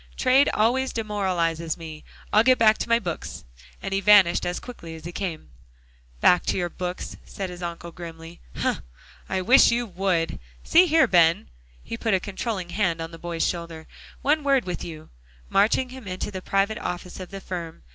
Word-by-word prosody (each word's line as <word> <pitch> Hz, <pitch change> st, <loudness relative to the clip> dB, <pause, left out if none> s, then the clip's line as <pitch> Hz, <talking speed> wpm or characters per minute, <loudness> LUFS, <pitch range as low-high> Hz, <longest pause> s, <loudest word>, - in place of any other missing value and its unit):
"Trade 265 Hz, +2 st, +4 dB
always 255 Hz, +5 st, +2 dB
demoralizes 180 Hz, -7 st, -1 dB
me. 155 Hz, -2 st, -9 dB, 0.3 s
I'll 215 Hz, -, +6 dB
get 255 Hz, +1 st, +5 dB
back 220 Hz, -1 st, +4 dB
to -, -, -3 dB
my 230 Hz, -, +5 dB
books," 175 Hz, -8 st, -5 dB, 0.4 s
and 195 Hz, -, -3 dB
he 195 Hz, -, +1 dB
vanished 195 Hz, -4 st, +5 dB
as 175 Hz, -, -2 dB
quickly 170 Hz, -10 st, -9 dB
as 160 Hz, -, -12 dB
he 175 Hz, -, -5 dB
came. 170 Hz, -, -5 dB, 0.7 s
"Back 180 Hz, -, +5 dB
to -, -, +1 dB
your 175 Hz, -1 st, -1 dB
books," 180 Hz, 0 st, -5 dB
said 190 Hz, -2 st, -6 dB
his 180 Hz, 0 st, -9 dB
uncle 170 Hz, 0 st, -6 dB
grimly, 165 Hz, 0 st, -10 dB, 0.2 s
"hum, -, -, -1 dB, 0.5 s
I 190 Hz, -, 0 dB
wish 250 Hz, +8 st, +6 dB
you 240 Hz, +1 st, +1 dB
would. 180 Hz, -4 st, -1 dB, 0.2 s
See 360 Hz, +2 st, +5 dB
here, 320 Hz, -2 st, +5 dB
Ben," 165 Hz, -, +3 dB, 0.3 s
he 230 Hz, -, -6 dB
put 225 Hz, -3 st, +1 dB
a -, -, +1 dB
controlling 195 Hz, -1 st, -4 dB
hand 175 Hz, -3 st, 0 dB
on 165 Hz, 0 st, -5 dB
the 165 Hz, -, -11 dB
boy's 170 Hz, -1 st, -1 dB
shoulder, 170 Hz, -2 st, -5 dB, 0.4 s
"one 295 Hz, +2 st, +2 dB
word 275 Hz, -3 st, +2 dB
with 180 Hz, -1 st, -4 dB
you," 155 Hz, -2 st, -9 dB, 0.4 s
marching 220 Hz, +6 st, +2 dB
him 255 Hz, -4 st, -10 dB
into 185 Hz, +2 st, -4 dB
the 190 Hz, -2 st, -6 dB
private 195 Hz, +3 st, 0 dB
office 180 Hz, +1 st, -5 dB
of 185 Hz, -, -8 dB
the 195 Hz, -, -7 dB
firm. 170 Hz, -, -7 dB
185 Hz, 185 wpm, -25 LUFS, 170-220 Hz, 0.7 s, I'll